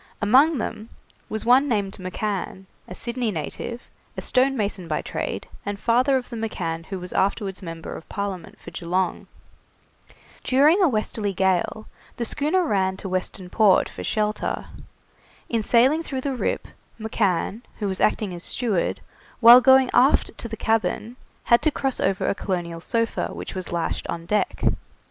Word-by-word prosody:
Among 270 +9 +5
them 220 -1 -5 0.4
was 220 0 -3
one 255 +4 +5
named 200 -4 0
McCann, 190 0 -4 0.2
a 180 - -8
Sydney 235 +1 -2
native, 215 +6 -5 0.3
a - - -2
stonemason 225 -9 +1
by 155 - -2
trade, - - -4 0.2
and 200 0 -4
father 250 +5 +3
of 250 - -5
the - - -5
McCann 165 -7 -4
who 190 -1 -5
was 180 0 -6
afterwards 195 0 0
member 165 -2 -7
of - - -11
Parliament 195 -4 -5
for - - -11
Geelong. 180 +1 -2 1.2
During 295 +9 +4
a 360 - +5
westerly 215 -3 -1
gale 190 +3 0 0.3
the 235 - -2
schooner 310 +9 +1
ran 190 -7 0
to 195 - -6
Western 185 0 -3
Port 210 -4 +4
for - - -8
shelter. 210 0 -1 0.8
In 230 -2 +1
sailing 255 +8 +4
through 270 -5 -4
the 275 0 -2
Rip, - - -2 0.3
McCann, 210 -1 -1 0.2
who 210 - -2
was 190 -1 -2
acting 210 -3 +1
as 175 0 -7
steward, 215 -8 -1 0.4
while 240 +1 +10
going 265 0 +6
aft 265 +3 +4
to - - -4
the 220 - -6
cabin, 220 +1 0 0.3
had 235 - +4
to 310 - +3
cross 270 -3 -2
over 195 -1 0
a - - +2
colonial 175 -4 -4
sofa 230 +5 -1
which - - -7
was 185 -2 -5
lashed 170 -1 -2
on 165 0 -5
deck. 210 +3 -1
215 Hz, 160 wpm, -24 LUFS, 185-245 Hz, 1.2 s, while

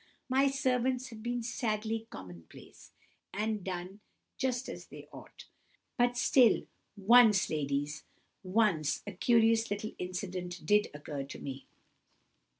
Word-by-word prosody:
My 270 +2 +3
servants 255 -1 0
have 225 -3 -10
been 240 +1 -2
sadly 225 -1 -2
common 90 -4 -10
place, - - -15 0.4
and 210 0 -2
done 185 +2 -5 0.4
just 260 -1 -1
as - - -8
they - - -12
ought. - - -12 0.5
But 245 0 +2
still, 245 -2 +4 0.3
once, 215 0 +5
ladies—once, 155 +4 -1
a 205 - -5
curious 225 +3 +3
little 205 +1 -3
incident 180 -1 -5
did 210 +4 +3
occur 150 -1 -5
to 140 - -9
me." 135 -1 -7
210 Hz, 120 wpm, -31 LUFS, 180-240 Hz, 0.5 s, once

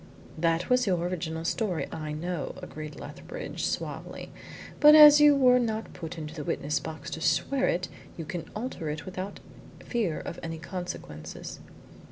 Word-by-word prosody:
"That 165 +1 +1
was 250 -2 +3
your 185 -2 +3
original 165 -2 -3
story, 185 -3 0
I 155 -1 -5
know," 165 +1 -3
agreed 155 0 -8
Lethbridge - - -7
suavely. - - -5 0.5
"But 300 +1 +9
as 300 -1 +10
you 295 -1 +8
were 250 -2 +6
not 225 -2 -2
put 165 -1 -7
into 155 -1 -6
the 155 -2 -5
witness 145 +1 -1
box 160 +1 -7
to 160 - -5
swear 270 +10 +2
it 180 +1 0 0.3
you 165 - -5
can 165 +1 -5
alter 215 -8 -4
it 150 +1 -4
without 190 +1 -6 0.5
fear 215 -10 -1
of 170 - -6
any 165 0 -5
consequences." 165 - -7
175 Hz, 160 wpm, -28 LUFS, 160-230 Hz, 0.5 s, as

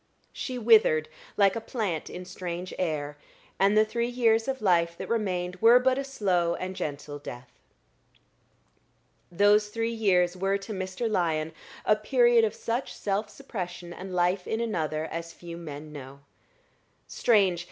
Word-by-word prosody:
She 255 -2 -4
withered 215 -10 +4 0.3
like 195 -2 +4
a 230 - -3
plant 210 -9 -3
in 180 0 -7
strange 180 -1 -6
air, 150 -4 -2 0.4
and 200 +2 +4
the 215 - +6
three 235 +2 -1
years 230 -2 +2
of 265 -1 -2
life 170 -5 +2
that - - -6
remained 180 -5 -1
were 230 +4 +7
but 255 +1 +2
a - - -1
slow 185 -10 0
and 185 +1 -5
gentle 145 -2 -5
death. 125 -3 -9 1.8
Those 205 +3 +4
three 230 +1 -2
years 185 -5 +2
were 195 +2 0
to 200 +2 -7
Mr. 190 +4 -3
Lyon 160 -6 0 0.3
a 215 - +5
period 240 0 +4
of 220 - 0
such 235 +3 -3
self 205 +1 -2
suppression 180 -7 -7
and 190 +2 -8
life 180 +1 +1
in 220 - -1
another 160 -9 -1
as 165 +1 -6
few 170 0 -9
men 155 -2 -8
know. 140 -1 -10 0.8
Strange! 195 -7 +2
190 Hz, 150 wpm, -27 LUFS, 170-225 Hz, 1.8 s, were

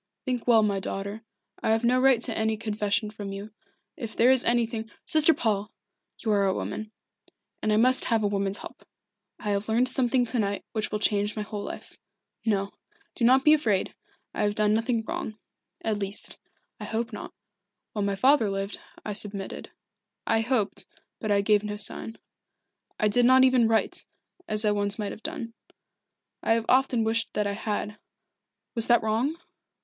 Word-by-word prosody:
"Think 250 -2 -2
well, 225 -3 +6
my 200 -2 +1
daughter. 200 +3 -5 0.4
I - - 0
have 225 +1 +2
no 250 +2 +3
right 265 -3 +5
to 230 - +2
any 220 0 0
confession 210 -1 -1
from 205 -2 -7
you. 200 +2 -7 0.4
If 230 -4 -7
there 245 +3 +5
is 260 -1 +4
anything 230 -2 0
" - - -42
"Sister 310 +1 +5
Paul 210 -7 -1 0.5
you 220 - -2
are 200 -1 +3
a 190 - +1
woman, 215 0 -5 0.7
and 215 - 0
I 210 - +3
must 255 +3 +4
have 225 -2 +1
a - - +3
woman's 200 0 -1
help. - - -10 0.5
I 210 - -3
have 200 +2 -2
learned 235 +3 +3
something 255 -1 +2
to 240 +1 -1
night 200 -1 -1
which 215 -2 -2
will 210 - 0
change 210 -1 0
my 215 - -2
whole 210 0 -6
life. - - -9 0.4
No 200 -3 0 0.4
do - - -4
not 260 +3 +5
be 305 - +7
afraid 220 -11 +1 0.4
I - - -3
have 205 0 +1
done 210 0 +2
nothing 225 +1 0
wrong. 215 - -4 0.5
At 215 -2 -1
least, 200 +1 -2 0.4
I - - -6
hope 230 +1 -3
not. - - -7 0.6
While 210 - -2
my 200 0 0
father 255 0 +4
lived, 195 +1 -3 0.3
I 210 - -3
submitted. 200 -1 +1 0.6
I 225 - +2
hoped, 225 -4 -1 0.3
but 215 - -4
I 200 0 +4
gave 210 0 +3
no 210 0 -4
sign. 220 +2 -3 0.8
I 215 - +3
did 240 +4 +3
not 260 +1 +6
even 255 -3 +5
write, 225 0 +1 0.4
as 215 +1 0
I 210 - +4
once 205 -1 -1
might 210 -2 -3
have - - -9
done. 280 -6 -5 0.9
I 225 - +2
have 225 0 0
often 255 -2 +3
wished 225 0 0
that 210 0 +1
I 200 - -1
had 210 0 -4 0.7
was 230 -2 -1
that 240 -1 +4
wrong?" 230 +9 0
220 Hz, 185 wpm, -27 LUFS, 205-235 Hz, 0.9 s, be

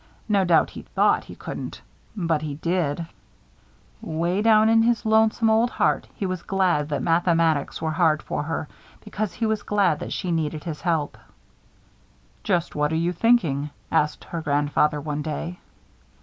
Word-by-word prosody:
No 200 -3 +3
doubt, 175 -3 +3
he - - -8
thought - - +1
he - - -11
couldn't. - - -7 0.4
But 165 -5 0
he 150 -2 -4
did. 165 -1 -1 1.0
'Way 170 +5 -1
down 220 0 +5
in 225 0 +5
his 230 -1 +1
lonesome 220 +1 +3
old 225 +2 +3
heart - - 0
he 200 - -3
was 185 -2 -3
glad 180 -7 +1
that 145 - -2
mathematics 165 -3 +1
were 160 - 0
hard 155 -2 +2
for - - -3
her, 155 +1 -3 0.3
because 210 -2 -4
he 225 - -2
was 220 -1 0
glad 200 -7 +1
that - - -6
she 180 -3 -2
needed 155 -2 -2
his 160 -4 -6
help. 160 -4 -1 1.2
"Just 175 -3 0
what 150 +1 0
are - - 0
you 170 +2 0
thinking?" 170 - +2 0.2
asked 150 0 +1
her 170 - -5
grandfather, 145 0 +1
one 150 0 -3
day. 165 +3 -5
170 Hz, 165 wpm, -24 LUFS, 150-205 Hz, 1.2 s, down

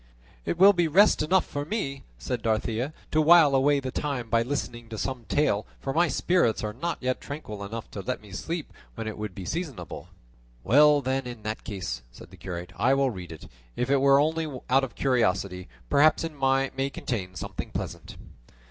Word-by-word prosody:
"It - - -1
will 195 +3 +8
be 175 -3 +2
rest 195 +7 +5
enough 185 +5 +3
for 145 - -4
me," 145 -6 -3 0.2
said 115 - -3
Dorothea, 115 +4 -1 0.2
"to 155 - +3
while 160 -2 +7
away 140 +2 +4
the 130 -1 -4
time 130 -6 -3
by 115 - +4
listening 120 -2 -4
to 110 - -6
some 125 0 -4
tale, 110 -8 +1
for 135 - -3
my 175 +3 +3
spirits 160 -10 +1
are 105 -1 -3
not 165 +8 -3
yet 130 0 -1
tranquil 110 -9 -7
enough 110 +3 -7
to 100 - -5
let - - -3
me 105 -2 -15
sleep 165 - -5 0.2
when 115 -1 -5
it 110 - -4
would 105 -3 -6
be 95 - -7
seasonable." 145 - -5 0.6
"Well 145 - +6
then, 130 0 -1
in 120 -3 -8
that 110 +1 -4
case," 90 - -5
said - - -14
the - - -14
curate, 90 0 -7
"I 130 +2 +3
will 135 -1 +2
read 90 -5 -8
it, 80 - -10 0.3
if 125 +2 -1
it 140 - +5
were 140 0 +6
only 160 +1 +1 0.2
out 135 +1 +5
of 135 - -5
curiosity; 95 -8 0 0.2
perhaps 155 - +4
it 165 - -3
may 135 -1 0
contain 95 -9 -4
something - - -6
pleasant." - - -6
130 Hz, 195 wpm, -27 LUFS, 110-145 Hz, 0.6 s, will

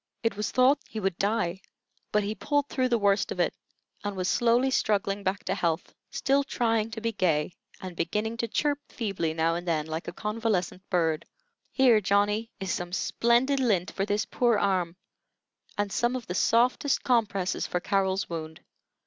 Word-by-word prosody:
It 225 -3 +1
was 210 +1 -2
thought 255 +3 +4
he 220 - -5
would 190 -4 -2
die; 195 -3 0 0.5
but 210 0 +2
he 205 +1 -2
pulled 290 +5 -1
through 255 -1 0
the 240 - +3
worst 200 -1 +2
of - - -4
it, - - +2 0.5
and 205 -1 -3
was 185 -1 -2
slowly 245 +4 +3
struggling 200 -4 +1
back 190 0 -2
to 190 - -1
health, 170 -4 -1 0.2
still 275 +1 +1
trying 225 -4 0
to 220 0 -7
be 230 0 0
gay, 175 -6 0 0.3
and 185 -3 -7
beginning 210 +7 -2
to 230 - -1
chirp 290 +5 0
feebly 195 -8 -2
now 165 +1 +2
and 175 +1 -4
then, 155 -3 0
like 160 +1 -5
a - - -3
convalescent 210 -4 -2
bird. 165 -4 0 0.4
"Here, 245 -5 +5
Johnny, 205 +3 +1
is 190 -2 -3
some 175 0 -3
splendid 240 +8 +2
lint 205 -8 +1
for 195 +1 -2
this 205 0 0
poor 240 -3 +2
arm, 185 -4 0 0.8
and 205 -1 -1
some 240 +4 +1
of 250 -3 -5
the 180 - -4
softest 245 +7 +2
compresses 205 -7 +1
for 180 - -1
Carrol's 195 0 0
wound. 160 -1 -6
205 Hz, 180 wpm, -27 LUFS, 180-230 Hz, 0.8 s, Here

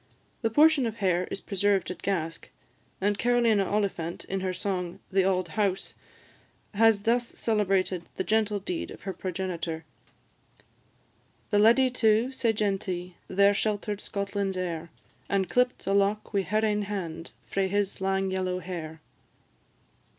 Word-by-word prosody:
The 225 - +1
portion 295 +1 +5
of 225 - -4
hair 185 -4 +1
is - - -5
preserved 195 -3 +1
at 180 - -8
Gask; 165 -4 -2 0.5
and 205 +1 0
Carolina 235 -5 +3
Oliphant, 195 -5 -2
in 195 - -2
her 185 0 -1
song, 180 -2 -3
"The 190 0 +3
Auld 185 -2 +1
House," 195 0 -1 0.8
has 215 -1 +4
thus 235 +2 +2
celebrated 195 -5 0
the - - -1
gentle 215 -1 +1
deed 185 -3 -4
of - - -11
her 195 - -3
progenitor: 175 -3 -4 1.7
"The 205 - +4
Leddy 235 +4 +5
too, 225 0 +3
sae 240 -3 +1
genty, 190 -4 -2
There 200 +2 +4
shelter'd 205 0 -1
Scotland's 200 -1 -2
heir, 170 -2 -3 0.4
An' 195 -1 +2
clipt 250 +5 +1
a 195 - +1
lock 200 +2 +1
wi' 200 - +3
her 215 +3 0
ain 210 -1 +1
hand 180 -5 -5
Frae 195 -1 0
his 200 0 -1
lang 195 0 0
yellow 185 -1 -1
hair." 165 -3 -6
195 Hz, 145 wpm, -28 LUFS, 185-215 Hz, 1.7 s, portion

